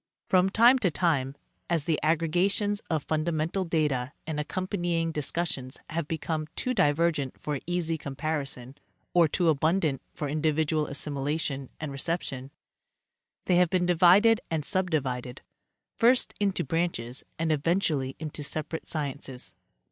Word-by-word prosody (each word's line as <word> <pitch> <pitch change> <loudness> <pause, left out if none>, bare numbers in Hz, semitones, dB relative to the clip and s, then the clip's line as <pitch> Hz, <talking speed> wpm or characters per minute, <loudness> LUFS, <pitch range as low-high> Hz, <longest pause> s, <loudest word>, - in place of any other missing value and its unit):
From 185 0 +4
time 235 +6 +6
to 195 - +2
time, 145 -5 0 0.3
as 165 -4 +1
the 155 0 0
aggregations 180 +6 +1
of 160 -4 0
fundamental 160 +3 -1
data 150 -6 0
and 155 -1 -3
accompanying 175 0 -1
dis 150 -3 -1
cussions 140 -7 -3
have 160 -1 -2
become 160 -1 -2
too 255 - -1
divergent 155 - +1
for 150 -2 -3
easy 170 -2 0
comparison 140 -3 -3 0.4
or 170 -2 +6
too 175 +3 +1
abundant 155 -1 +2
for 150 - -3
individual 155 +1 +1
assimilation 140 -1 -2
and 155 -2 -4
reception, 135 -3 -3 1.0
they 180 - +3
have 180 -1 +4
been 180 0 +1
divided 185 +6 +5
and 155 -3 -1
subdivided 135 -9 -1 0.6
first 245 +2 +4
into 200 -2 +1
branches 140 -5 -1
and 160 0 0
eventually 150 -3 0
into 155 -1 -5
separate 155 +2 -3
sciences. 140 -4 -3
160 Hz, 130 wpm, -28 LUFS, 145-175 Hz, 1.0 s, time